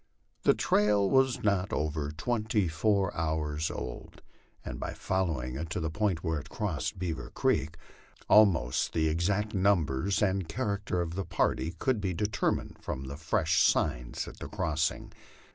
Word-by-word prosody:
The - - +4
trail 105 -1 +3
was 130 +2 +3
not 100 -2 +1
over 75 -1 -1
twenty 105 +4 0
four 95 +4 +1
hours 80 -1 -1
old, - - -7 0.4
and - - -5
by - - -4
following 80 -10 -1
it 80 +2 -4
to 90 - -2
the 80 -2 -2
point 95 -2 0
where 80 -2 0
it 70 - -11
crossed 95 -3 -3
Beaver 90 -3 -4
creek, 75 +4 0 0.5
almost 90 - +4
the 80 -1 +2
exact 100 +7 0
numbers 95 -3 +2
and 95 -3 0
character 100 -7 -1
of 85 -1 -3
the 95 +2 -2
party 85 -1 0
could 125 +3 0
be 95 -3 -1
determined 105 +2 -1
from 65 - -4
the 70 +1 -6
fresh 80 0 +1
signs - - +1
at - - -10
the - - -6
crossing. 80 0 -1
85 Hz, 155 wpm, -30 LUFS, 80-100 Hz, 0.5 s, The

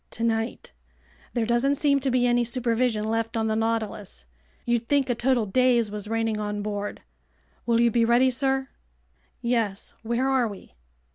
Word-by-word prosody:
"Tonight. 225 0 -2 0.6
There 235 -2 +1
doesn't 240 +5 +2
seem 280 -1 +2
to 270 0 -1
be 250 -1 +2
any 240 0 +3
supervision 235 -2 0
left 225 +1 -1
on 220 - 0
the 220 0 0
Nautilus. 220 - -3 0.4
You'd 235 -1 0
think 280 -3 +2
a - - +2
total 240 -1 +1
daze 240 +1 +2
was 210 0 -6
reigning 225 -1 -1
on 210 -1 -3
board. 205 -1 -4 0.6
Will 230 -1 +3
you 235 0 +4
be 235 +1 +2
ready, 240 +3 +4
sir?" 265 +1 0 0.7
"Yes. 230 -5 -1
Where 235 +3 -1
are 260 -3 +2
we?" 200 - -10
235 Hz, 160 wpm, -25 LUFS, 220-250 Hz, 0.7 s, you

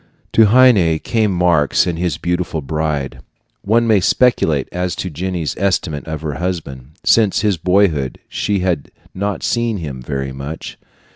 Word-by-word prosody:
To 110 -1 +6
Heine 105 -9 +5
came 110 +5 0
Marx 85 -5 +2
and 85 -2 -3
his 90 -1 -1
beautiful 90 -2 -2
bride. 75 -1 -3 0.4
One 115 +3 +2
may 110 -3 +4
speculate 90 - +2
as 90 0 -2
to 90 - -4
Jenny's 85 0 -3
estimate 90 -6 -1
of 80 -1 -4
her 75 -2 -4
husband. 75 -7 -5
Since 110 -4 +3
his 105 -4 +1
boyhood, 85 -7 +1
she 100 -2 -1
had 90 -6 -1 0.2
not 100 +1 -3
seen 120 -2 0
him 70 -7 -6
very 70 +1 -4
much. 70 +4 -7
90 Hz, 150 wpm, -18 LUFS, 75-100 Hz, 0.4 s, To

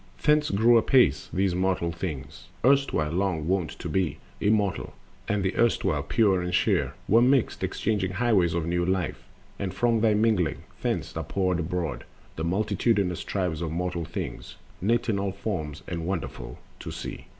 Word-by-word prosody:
Thence 150 0 +4
grew 115 +4 +5
apace 115 - +3
Those 95 0 +1
mortal 90 -2 0
Things, 75 -4 -6 0.2
erstwhile 135 - +3
long 90 -3 -1
wont 90 -3 +1
to - - -6
be 90 -6 0 0.2
Immortal, 105 -2 +1 0.3
and 105 -1 0
the 95 - -1
erstwhile 110 -10 +2
pure 95 +5 +2
and 90 0 -1
sheer - - +1
Were 115 +3 +5
mixed, 130 0 +2
exchanging 100 -4 -1
highways 95 -6 +2
of 85 -2 -1
new 85 +1 0
life, 95 0 -1 0.4
And 95 -2 -2
from 115 +3 +1
their 110 -2 +4
mingling 105 -6 +1 0.2
thence - - -2
are - - -2
poured 90 -2 0
abroad 85 -2 -3 0.3
The 80 - -4
multitudinous 100 0 +1
tribes 90 -5 -2
of 85 - -2
mortal 85 +1 -2
things, - - -6 0.3
Knit 115 +6 +1
in 105 -4 +1
all 100 -1 -2
forms 90 -8 -4
and 85 -2 -4
wonderful 95 -4 -4 0.2
to - - -7
see. - - -7
95 Hz, 160 wpm, -26 LUFS, 85-110 Hz, 0.4 s, grew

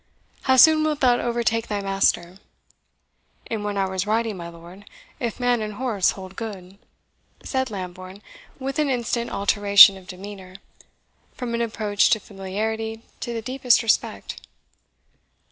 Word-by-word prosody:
How 260 - +6
soon 310 +3 +7
wilt 305 -2 -1
thou 245 -2 +4
overtake 235 -1 -1
thy 205 -1 -2
master?" 195 -2 0 1.1
"In 225 -2 -4
one 205 -1 -3
hour's 190 0 -1
riding, 225 0 0
my 170 -2 -7
lord, 170 +4 -14 0.3
if 235 -1 -4
man 245 -2 +1
and 210 -1 -5
horse 220 -5 +1
hold 190 0 -10
good," 195 -4 -8 0.6
said 260 -1 -2
Lambourne, 185 0 -8 0.3
with 270 +2 -4
an 300 -2 +1
instant 240 -2 -1
alteration 200 0 +6
of 185 -1 -15
demeanour, 190 0 -10 0.8
from 245 -2 -5
an 235 - -1
approach 215 -3 +1
to 220 - +3
familiarity 220 +3 -4 0.2
to 240 - -5
the 230 -1 -4
deepest 255 -1 +2
respect. 225 - -1
215 Hz, 140 wpm, -23 LUFS, 195-235 Hz, 1.1 s, soon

